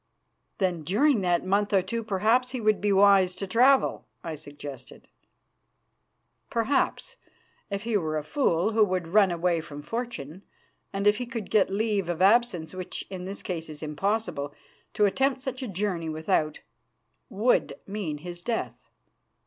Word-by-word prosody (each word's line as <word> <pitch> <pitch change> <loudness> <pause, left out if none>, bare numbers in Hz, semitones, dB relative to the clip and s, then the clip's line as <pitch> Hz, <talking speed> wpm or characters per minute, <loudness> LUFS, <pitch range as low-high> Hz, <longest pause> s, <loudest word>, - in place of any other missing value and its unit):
"Then 180 -5 0
during 215 - +2
that 175 -1 +1
month 200 +2 +1
or 190 -2 +4
two 230 +3 -3
perhaps 220 +5 +2
he 255 0 -4
would 215 -2 +2
be 205 0 +2
wise 195 -2 +5
to 195 - -4
travel," 255 +7 +3 0.2
I 165 - -4
suggested. 145 -3 -10 1.4
"Perhaps, 235 +4 0 0.5
if 200 0 -3
he 230 -1 -1
were 155 -4 -2
a 150 - -3
fool 185 - +1
who 220 0 +4
would 185 -4 -1
run 200 +1 +5
away 170 -1 0
from 145 -2 -9
fortune, 190 - -5 0.5
and 195 0 -3
if 205 0 +5
he 245 - -4
could 230 -5 -6
get 210 -3 +4
leave 200 -2 0
of 170 -1 -2
absence, 195 -5 +3
which 185 -1 -5
in 185 -1 -6
his 200 +1 -5
case 165 -3 -4
is 155 0 -9
impossible; 155 -2 -2 0.4
to 210 - +4
attempt 265 +6 +1
such 265 0 -4
a 255 - -3
journey 185 -4 -2
without 155 -1 0
it - - -23 0.7
would 220 +6 +1
mean 195 -7 -4
his 175 +3 -8
death. 230 +4 -4
195 Hz, 160 wpm, -27 LUFS, 170-220 Hz, 1.4 s, wise